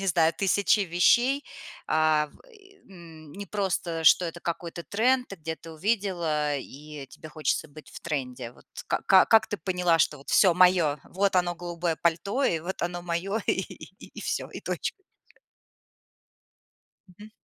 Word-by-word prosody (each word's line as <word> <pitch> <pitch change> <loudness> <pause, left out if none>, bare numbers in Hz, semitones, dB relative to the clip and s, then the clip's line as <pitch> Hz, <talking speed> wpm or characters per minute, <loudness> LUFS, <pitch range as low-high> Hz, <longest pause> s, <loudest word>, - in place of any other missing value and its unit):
не 195 - -3
знаю, 165 -3 +3
1000 200 +2 +2
вещей? 240 +10 +3 0.4
А, 155 -1 +2
в - - -22
и, 400 -4 -20
м, 165 -5 -13
не 200 +4 -7
просто, 185 -5 -2
что 170 - +6
это 170 0 -6
какой-то 170 0 -5
тренд, 245 - +1
ты 195 - -8
где-то 160 0 -7
увидела, 170 -5 -1
э, - - -3
и 150 0 -10
тебе 155 - -11
хочется 155 0 -2
быть 150 +1 -14
в - - -10
тренде. 130 -6 -4
Вот - - -21 0.2
ка 190 -1 +4
как 220 -1 +5
ты 210 - -4
поняла, 180 -3 +1
что 150 - +2
вот 140 - -10
все 185 -4 +5
моё, 180 -5 +4
вот 195 +1 0
оно 175 -1 +1
голубое 175 -1 -3
пальто 185 - 0
и 165 - +1
вот 180 +4 -5
оно 175 0 -3
моё, 180 +5 -2
и - - -5
всё, - - -2
и - - -9
точка. - - -2 2.2
Мгм. 205 +4 -14
175 Hz, 160 wpm, -27 LUFS, 160-195 Hz, 2.2 s, что